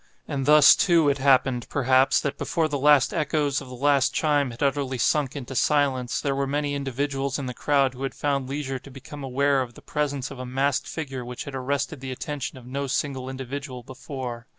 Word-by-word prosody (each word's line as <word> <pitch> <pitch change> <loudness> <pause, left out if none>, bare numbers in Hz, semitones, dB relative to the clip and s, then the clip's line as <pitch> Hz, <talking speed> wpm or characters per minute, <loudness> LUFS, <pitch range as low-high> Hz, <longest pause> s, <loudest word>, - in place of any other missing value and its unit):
And 140 -2 -3
thus, 150 -1 +8
too, 170 -5 +4
it 140 0 0
happened, 130 -3 +3
perhaps, 130 -1 +3
that 140 -1 -3
before 165 -2 0
the 145 -2 -3
last 145 -1 +5
echoes 145 -2 0
of 135 - -10
the 125 - -8
last 140 +1 +2
chime 145 -3 +2
had 120 +3 -5
utterly 140 -2 0
sunk 140 +3 +1
into 135 -2 -6
silence, 135 -3 +1
there 140 - -1
were 140 0 -1
many 145 +1 -1
individuals 140 0 -2
in 140 - -4
the 125 - -4
crowd 140 0 +1
who 130 - -11
had 135 - -3
found 140 -3 -1
leisure 135 -2 -3
to 140 - -14
become 140 +2 -10
aware 135 +1 +1
of 120 -2 -6
the - - -13
presence 145 -3 -2
of 135 - -9
a - - -4
masked 135 +2 0
figure 135 -5 -5
which 125 0 -6
had 140 - -8
arrested 140 +3 -2
the 130 0 -6
attention 135 +1 -5
of 125 - -13
no 140 +2 -3
single 130 -1 -2
individual 130 0 -6
before. 125 -2 -7
140 Hz, 210 wpm, -25 LUFS, 130-145 Hz, -, thus